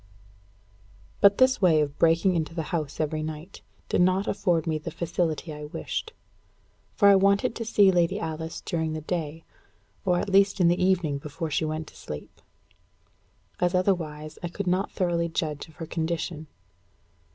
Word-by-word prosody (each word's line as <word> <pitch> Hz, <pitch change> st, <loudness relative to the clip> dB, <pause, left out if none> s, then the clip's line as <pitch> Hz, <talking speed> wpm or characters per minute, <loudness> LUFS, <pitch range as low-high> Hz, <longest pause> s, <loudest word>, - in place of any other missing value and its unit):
_ -, -, -30 dB, 1.2 s
But 200 Hz, 0 st, +6 dB
this 260 Hz, -2 st, +4 dB
way 170 Hz, -5 st, +5 dB
of 145 Hz, -1 st, -2 dB
breaking 165 Hz, +3 st, +4 dB
into 165 Hz, 0 st, -2 dB
the 165 Hz, -, -2 dB
house 150 Hz, -4 st, -2 dB
every 155 Hz, 0 st, -1 dB
night 155 Hz, +4 st, -7 dB, 0.3 s
did -, -, +1 dB
not 185 Hz, +2 st, +3 dB
afford 180 Hz, -5 st, +1 dB
me 160 Hz, -2 st, -1 dB
the 150 Hz, -, -6 dB
facility 165 Hz, -2 st, -2 dB
I 150 Hz, 0 st, -7 dB
wished. 450 Hz, -, -5 dB, 0.8 s
For 200 Hz, -, +5 dB
I 200 Hz, -, +8 dB
wanted 200 Hz, +5 st, +3 dB
to 230 Hz, -, -5 dB
see 205 Hz, -3 st, +5 dB
Lady 180 Hz, +2 st, +1 dB
Alice 160 Hz, -3 st, -5 dB
during 160 Hz, -2 st, -2 dB
the 155 Hz, -, -4 dB
day, 160 Hz, -1 st, -4 dB, 0.6 s
or 180 Hz, -4 st, +2 dB
at 175 Hz, -, -1 dB
least 195 Hz, 0 st, +3 dB
in 175 Hz, -2 st, +5 dB
the 175 Hz, +1 st, +1 dB
evening 175 Hz, -7 st, +1 dB
before 150 Hz, +3 st, -5 dB
she 155 Hz, +2 st, 0 dB
went 155 Hz, 0 st, -3 dB
to -, -, -21 dB
sleep; 75 Hz, -1 st, -9 dB, 1.2 s
as 180 Hz, +1 st, +1 dB
otherwise 155 Hz, -5 st, -1 dB
I 175 Hz, -, -3 dB
could 195 Hz, +4 st, -5 dB
not 185 Hz, +2 st, +1 dB
thoroughly 170 Hz, -3 st, 0 dB
judge 155 Hz, -3 st, -3 dB
of 160 Hz, -, -18 dB
her 165 Hz, -, -6 dB
condition. 160 Hz, -1 st, -3 dB
170 Hz, 175 wpm, -26 LUFS, 155-185 Hz, 1.2 s, I